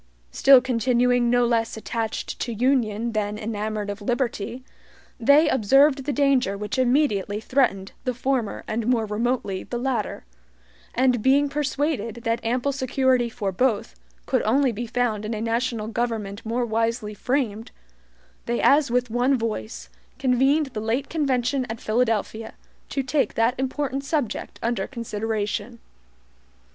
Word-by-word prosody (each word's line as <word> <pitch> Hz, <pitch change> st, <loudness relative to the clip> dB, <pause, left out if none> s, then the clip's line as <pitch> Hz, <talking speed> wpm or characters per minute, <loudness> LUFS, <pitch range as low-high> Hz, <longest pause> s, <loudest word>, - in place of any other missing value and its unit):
Still 270 Hz, -2 st, +7 dB
continuing 245 Hz, 0 st, +2 dB
no 245 Hz, 0 st, +3 dB
less 230 Hz, -1 st, 0 dB
attached 225 Hz, 0 st, -4 dB
to 240 Hz, -, -2 dB
union 235 Hz, -2 st, +1 dB
than 210 Hz, -1 st, -2 dB
enamored 215 Hz, -1 st, -3 dB
of 205 Hz, +1 st, -8 dB
liberty, 240 Hz, +1 st, -2 dB, 0.6 s
they 285 Hz, +6 st, +5 dB
observed 270 Hz, +3 st, +4 dB
the 290 Hz, -, 0 dB
danger 270 Hz, -8 st, +2 dB
which 210 Hz, +5 st, -3 dB
immediately 240 Hz, -6 st, +1 dB
threatened 220 Hz, -6 st, 0 dB
the 255 Hz, -1 st, -2 dB
former 255 Hz, -4 st, -1 dB
and 220 Hz, +1 st, -2 dB
more 240 Hz, -3 st, +2 dB
remotely 210 Hz, -2 st, -1 dB
the 240 Hz, -, -5 dB
latter; 240 Hz, -, -2 dB, 0.7 s
and 250 Hz, -2 st, +2 dB
being 280 Hz, +4 st, +3 dB
persuaded 280 Hz, -5 st, -2 dB
that 230 Hz, -1 st, -1 dB
ample 245 Hz, +4 st, 0 dB
security 260 Hz, -2 st, +1 dB
for 215 Hz, -4 st, -3 dB
both 225 Hz, -, 0 dB, 0.3 s
could -, -, +1 dB
only 260 Hz, +4 st, +2 dB
be 235 Hz, +2 st, -5 dB
found 225 Hz, -3 st, -1 dB
in 215 Hz, +1 st, -3 dB
a -, -, -4 dB
national 230 Hz, 0 st, -1 dB
government 220 Hz, -3 st, -3 dB
more 235 Hz, +2 st, -1 dB
wisely 225 Hz, -1 st, -1 dB
framed, 230 Hz, -2 st, -2 dB, 0.8 s
they 235 Hz, 0 st, 0 dB
as 285 Hz, -1 st, +4 dB
with 245 Hz, -1 st, 0 dB
one 250 Hz, +3 st, +2 dB
voice, 225 Hz, -1 st, -4 dB, 0.3 s
convened 270 Hz, +4 st, +3 dB
the 215 Hz, -, -3 dB
late 235 Hz, +6 st, -1 dB
convention 270 Hz, -4 st, 0 dB
at 225 Hz, 0 st, -5 dB
Philadelphia, 225 Hz, -1 st, -1 dB, 0.3 s
to 275 Hz, -, -1 dB
take 260 Hz, -3 st, 0 dB
that 230 Hz, +2 st, +3 dB
important 270 Hz, +1 st, -2 dB
subject 280 Hz, -6 st, -3 dB
under 230 Hz, -4 st, -1 dB
consideration. 225 Hz, -1 st, -3 dB
240 Hz, 140 wpm, -24 LUFS, 220-260 Hz, 0.8 s, Still